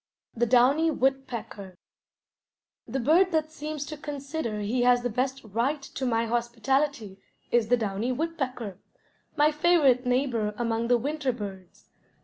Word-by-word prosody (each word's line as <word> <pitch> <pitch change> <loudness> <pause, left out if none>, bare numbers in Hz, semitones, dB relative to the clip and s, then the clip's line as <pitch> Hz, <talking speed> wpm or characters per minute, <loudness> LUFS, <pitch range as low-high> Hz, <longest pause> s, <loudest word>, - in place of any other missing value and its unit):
THE 240 +1 +1
DOWNY 265 +7 +4
WOODPECKER 245 - -2 1.1
The 270 - -2
bird 340 +9 +4
that 315 -1 0
seems 300 -1 -5
to 305 - -6
consider 285 -6 -4
he 230 +5 0
has 245 0 +4
the 245 - -1
best 260 +3 -2
right 235 +8 -1
to 270 -1 -5
my 230 -1 +1
hospitality 240 -1 -1 0.3
is 235 -2 +3
the 245 +2 +3
downy 215 +2 -2
woodpecker, 255 - -3 0.6
my 300 0 +4
favorite 300 -5 +3
neighbor 245 -5 0
among 230 -1 -1
the 245 0 +4
winter 285 +2 -1
birds. 195 -6 -9
250 Hz, 135 wpm, -27 LUFS, 230-290 Hz, 1.1 s, DOWNY